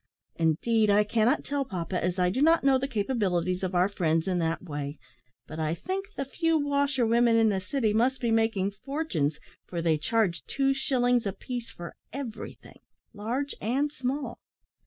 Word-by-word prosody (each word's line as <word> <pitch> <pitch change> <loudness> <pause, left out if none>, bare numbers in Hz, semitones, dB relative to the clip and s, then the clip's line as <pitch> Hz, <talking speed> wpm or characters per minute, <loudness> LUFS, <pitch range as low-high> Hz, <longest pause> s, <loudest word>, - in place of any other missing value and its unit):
"Indeed, 210 +7 +2
I 205 +1 +5
cannot 225 +6 +1
tell, 285 -1 -1
papa, 180 -5 -3
as 180 +1 0
I 180 -1 +2
do 260 - -1
not 325 +2 +5
know 270 -1 +4
the 270 - -2
capabilities 200 -7 0
of 185 -1 -2
our 180 +1 +4
friends 165 -4 0
in 180 -2 +1
that 165 +1 -1
way; 145 -3 -5 0.5
but 155 - -8
I 155 +1 0
think 385 - -4
the 275 - -3
few 330 +4 +1
washerwomen 270 -5 +2
in 225 -1 +5
the 195 -2 0
city 215 +2 0
must 250 +4 +2
be 235 -2 0
making 225 -3 +2
fortunes, 200 - -2 0.3
for 175 - -4
they 165 -2 +2
charge 190 -1 0
two 275 0 +1
shillings 245 -4 +1
a - - 0
piece 240 +4 -6
for 175 -1 -9 0.2
everything, 255 -5 -8 0.3
large 245 +7 -2
and 270 +7 0
small." 260 -2 -3
225 Hz, 175 wpm, -28 LUFS, 180-270 Hz, 0.5 s, I